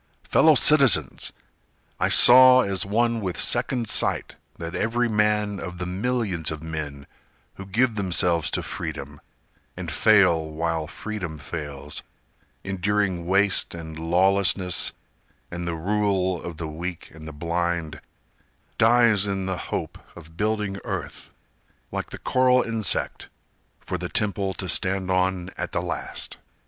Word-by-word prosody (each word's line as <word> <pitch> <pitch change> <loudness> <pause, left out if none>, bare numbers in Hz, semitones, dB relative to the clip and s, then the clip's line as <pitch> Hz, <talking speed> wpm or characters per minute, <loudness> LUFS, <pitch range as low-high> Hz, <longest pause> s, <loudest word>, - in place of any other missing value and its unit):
Fellow 155 -1 +4
citizens! 130 - +4 0.7
I - - +1
saw 130 +1 +8
as 95 -3 -2
one 115 +2 0
with 95 -3 -4
second 120 -4 +1
sight - - +1 0.2
That 85 +1 -6
every 120 +4 0
man 105 -2 0
of 90 +1 -7
the 90 - -4
millions 95 -3 -2
of 80 0 -6
men 75 -3 -6 0.5
Who 95 - -9
give 115 +5 +1
themselves 90 -5 0
to - - -4
Freedom, 70 +1 -7 0.6
And - - -5
fail 95 -7 +4
while 80 0 -3
Freedom 90 -4 -6
fails, 75 0 -7 0.6
Enduring 95 -2 -1
waste 100 -1 +2
and 80 -1 -8
lawlessness, 90 +2 +1 0.6
And 85 0 -5
the 85 - -2
rule 95 0 -1
of 85 -2 -8
the 80 -1 -5
weak 85 +3 -7
and 80 0 -11
the - - -6
blind, 85 0 -3 0.8
Dies 115 -3 +4
in 95 -1 -2
the 95 -1 -3
hope - - -4 0.2
of 80 -1 -14
building 105 -1 -2
earth, - - -6 0.6
Like - - -4
the - - -8
coral 125 0 +2
insect, 110 -5 -1 0.5
for 90 - -5
the 90 0 -5
temple 100 -2 -2
To 95 - -5
stand 95 +1 +1
on 95 0 0
at - - -4
the - - 0
last. - - -6
95 Hz, 135 wpm, -24 LUFS, 85-105 Hz, 0.8 s, saw